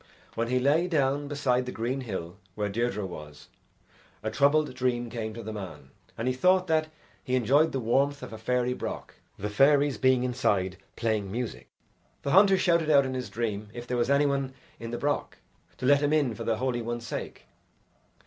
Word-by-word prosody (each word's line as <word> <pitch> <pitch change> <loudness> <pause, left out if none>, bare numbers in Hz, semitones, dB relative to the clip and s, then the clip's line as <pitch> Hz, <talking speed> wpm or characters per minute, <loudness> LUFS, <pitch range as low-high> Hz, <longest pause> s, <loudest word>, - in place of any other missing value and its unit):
When 115 +1 -1
he 125 +1 +1
lay 145 +7 +3
down 145 -3 +1
beside 130 -3 0
the - - -3
green 125 +4 -2
hill 95 -6 -5 0.2
where 105 -1 -1
Deirdre 110 -1 -1
was, 75 -5 -10 0.7
a 110 - -2
troubled 145 +4 +3
dream 120 -2 -1
came 110 -2 -4
to 115 - -7
the 110 +1 -5
man, 80 -10 -8 0.3
and 115 - -2
he 130 - +2
thought 185 +7 +3
that 160 -2 +1 0.4
he 130 - 0
enjoyed 135 +6 +3
the 135 - -2
warmth 135 +4 +1
of 125 - -8
a - - -6
fairy 125 +2 0
broch, - - -5 0.3
the 105 - -3
fairies 140 +5 +3
being 130 -1 +3
inside 100 -7 0 0.2
playing 110 -4 -1
music. 120 +1 -4 0.6
The 140 - -1
hunter 195 +2 +6
shouted 170 -4 +2
out 140 -2 +6
in 130 - -3
his 130 -1 -4
dream 110 -3 -3
if 120 0 -6
there 125 - -5
was 120 +1 +1
any 140 +1 +4
one 135 -2 -1 0.2
in 115 - -6
the 120 - -3
broch, 145 +2 -1 0.4
to 130 - -4
let 140 +2 +5
him 145 +1 +2
in 145 -6 +2
for - - -7
the 115 -1 +1
Holy 125 0 -1
One's 120 0 -4
sake. - - -6
125 Hz, 195 wpm, -28 LUFS, 115-140 Hz, 0.7 s, hunter